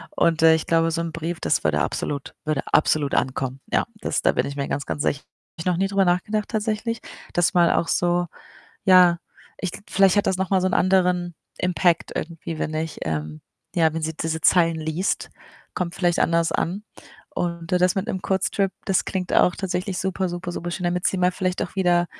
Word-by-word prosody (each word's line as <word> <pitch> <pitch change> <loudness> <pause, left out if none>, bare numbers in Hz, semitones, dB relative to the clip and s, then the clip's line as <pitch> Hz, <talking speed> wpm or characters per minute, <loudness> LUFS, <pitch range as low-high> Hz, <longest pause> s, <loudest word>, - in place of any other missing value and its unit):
und, 165 -1 +2
äh, 160 0 +8
ich 160 - -3
glaube, 165 0 +2
so 165 +1 -1
’n 170 - -3
Brief, 165 +1 -4
das - - +1
würde 75 -1 +1
absolut 140 -1 -3
würde 155 -3 0
absolut 150 -2 +2
ankommen. 130 0 -1
Ja, - - +2 0.2
das - - -1
da - - +4
bin - - 0
ich 140 - -5
mir 140 -1 -2
ganz, 140 - -3
ganz 145 - -3
sicher. 140 - 0
Habe - - -43
ich 165 - -5
noch 180 -2 +1
nie 195 +2 +1
drüber 195 -1 +2
nachgedacht 200 +4 0
tatsächlich, 220 +1 -2 0.3
dass 175 +1 +2
mal 175 -1 +4
auch 165 - +1
so 175 0 +1 0.6
ja, 180 -3 +6 0.4
ich 185 - -2 0.2
vielleicht 195 0 +4
hat 205 - +2
das 190 - +1
noch 190 0 -2
mal 190 -2 +3
so 185 - +1
’n 185 - +1
anderen 180 -2 +2 0.2
Impact 180 -2 +1
irgendwie, 165 0 -5
wenn 155 - -2
ich, 160 0 -3
ähm, 75 -1 -3 0.3
ja 160 -2 +3
wenn 165 - -3
sie 160 +1 -2
diese 160 +1 -3
Zeilen 165 -1 +4
liest, 160 +5 -2 0.4
kommt 175 -2 -3
vielleicht 175 -2 +1
anders 165 0 +2
an. 195 +6 -2 0.5
Und 170 0 -3
das 180 +1 +3
mit 195 +4 -1
’nem 190 -4 -3
Kurztrip, 195 0 0
das 190 - +1
klingt 185 -1 -3
auch 180 - +4
tatsächlich 185 0 -3
super, 190 0 -1
super, 175 0 -5
super 175 0 -4
schön, 180 +1 -4
damit 180 +1 -1
sie - - 0
mal 180 0 +2
vielleicht 185 0 -1
auch - - -6
wieder 175 -2 +2
175 Hz, 210 wpm, -23 LUFS, 160-185 Hz, 0.6 s, äh